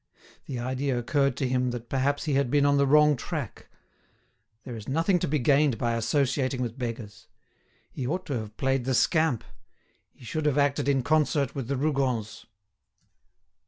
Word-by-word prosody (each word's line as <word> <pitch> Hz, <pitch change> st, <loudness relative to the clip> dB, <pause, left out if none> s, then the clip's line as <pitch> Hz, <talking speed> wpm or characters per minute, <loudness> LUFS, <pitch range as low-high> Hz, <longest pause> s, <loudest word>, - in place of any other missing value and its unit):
The 130 Hz, -, -4 dB
idea 130 Hz, +2 st, -2 dB
occurred 140 Hz, +2 st, 0 dB
to 135 Hz, -, 0 dB
him 125 Hz, 0 st, 0 dB
that 120 Hz, -1 st, -6 dB
perhaps 140 Hz, +2 st, 0 dB
he 150 Hz, -, -1 dB
had 135 Hz, -2 st, +1 dB
been 145 Hz, +1 st, +3 dB
on 140 Hz, 0 st, +3 dB
the 140 Hz, 0 st, +3 dB
wrong 150 Hz, +1 st, +5 dB
track. 140 Hz, -, -6 dB, 1.0 s
There 125 Hz, -, -7 dB
is 110 Hz, +1 st, -8 dB
nothing 165 Hz, +6 st, +2 dB
to -, -, -1 dB
be 150 Hz, +1 st, +1 dB
gained 140 Hz, -1 st, +3 dB
by 120 Hz, +2 st, 0 dB
associating 130 Hz, +3 st, 0 dB
with 120 Hz, +2 st, -5 dB
beggars. 115 Hz, -4 st, -6 dB, 0.6 s
He 125 Hz, -, -4 dB
ought 180 Hz, +6 st, -2 dB
to 145 Hz, -, -4 dB
have 110 Hz, 0 st, -9 dB
played 135 Hz, -2 st, 0 dB
the 130 Hz, -1 st, +1 dB
scamp; 155 Hz, -1 st, +2 dB, 0.7 s
he 125 Hz, -, -17 dB
should 155 Hz, +5 st, -2 dB
have 145 Hz, -1 st, +1 dB
acted 140 Hz, 0 st, +1 dB
in 135 Hz, -2 st, +2 dB
concert 145 Hz, -1 st, +1 dB
with 135 Hz, -4 st, -5 dB
the 140 Hz, 0 st, -1 dB
Rougons. 130 Hz, -7 st, -1 dB
135 Hz, 175 wpm, -27 LUFS, 120-145 Hz, 1.0 s, wrong